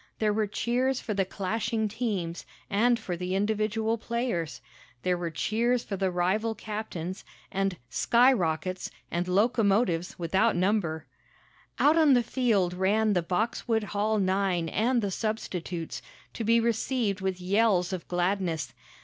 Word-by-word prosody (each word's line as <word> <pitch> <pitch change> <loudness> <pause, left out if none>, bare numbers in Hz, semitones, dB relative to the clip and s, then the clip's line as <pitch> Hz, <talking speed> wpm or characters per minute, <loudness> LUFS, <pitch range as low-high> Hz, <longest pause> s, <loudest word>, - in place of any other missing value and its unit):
There 215 -1 +1
were 215 0 +1
cheers 250 +5 0
for 215 - -3
the 195 -1 +1
clashing 220 +4 -1
teams, 200 -7 -3 0.3
and 235 +4 +3
for 200 -6 -4
the 180 +2 -3
individual 220 +2 0
players. 230 -9 -2 0.4
There 180 - +2
were 175 -1 -3
cheers 235 +9 0
for 200 - -4
the 190 0 0
rival 190 +6 0
captains, 210 -5 -5 0.3
and 195 -2 -1
"skyrockets," 185 - +2 0.2
and 175 +1 -1
"locomotives" 200 -3 +2
without 190 +6 +2
number. 175 -4 0 0.7
Out 310 +3 +4
on 295 -4 +6
the 245 - +3
field 215 -8 +1
ran 205 +4 +2
the 180 - +2
Boxwood 220 +5 0
Hall 215 +2 +1
nine 190 -3 +1
and 235 +4 +1
the 200 - -1
substitutes, 180 -6 -3 0.3
to 230 - -4
be 230 +2 +4
received 230 -3 0
with 190 -1 -2
yells 190 -1 +2
of 180 - -5
gladness. 180 -2 -1
205 Hz, 140 wpm, -28 LUFS, 180-225 Hz, 0.7 s, on